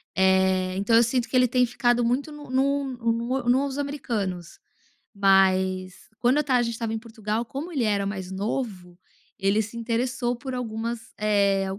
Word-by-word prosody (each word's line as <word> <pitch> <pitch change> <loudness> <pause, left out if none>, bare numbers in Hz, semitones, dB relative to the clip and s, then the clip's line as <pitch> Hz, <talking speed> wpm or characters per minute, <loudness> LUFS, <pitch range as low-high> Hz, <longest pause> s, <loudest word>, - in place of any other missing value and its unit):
eh, 190 0 +3
então 200 +4 +2
eu 230 - +7
sinto 240 +1 0
que - - -5
ele 250 0 +5
tem 250 +1 +3
ficado 240 0 +1
muito 260 +6 0
no 295 -1 -10
no 280 +2 +2 0.3
no 240 +3 -1
nos 270 +2 +2
americanos, 210 - -4 0.6
mas 190 -1 +3 0.2
quando 245 +5 +3
eu - - +4
estava 265 -4 +2
a - - +2
gente 235 0 -2
estava 225 -1 -3
em 225 - -2
Portugal 220 -1 -3
como 285 +9 -6
ele 275 -7 0
era 205 -2 +1
mais 190 -2 -5
novo, 190 -3 -4 0.4
ele 195 +2 +2
se 215 +2 -10
interessou 240 +1 -1
por 260 +2 -7
algumas 230 -1 -3 0.2
eh 200 -2 +2
230 Hz, 175 wpm, -25 LUFS, 195-250 Hz, 0.6 s, eu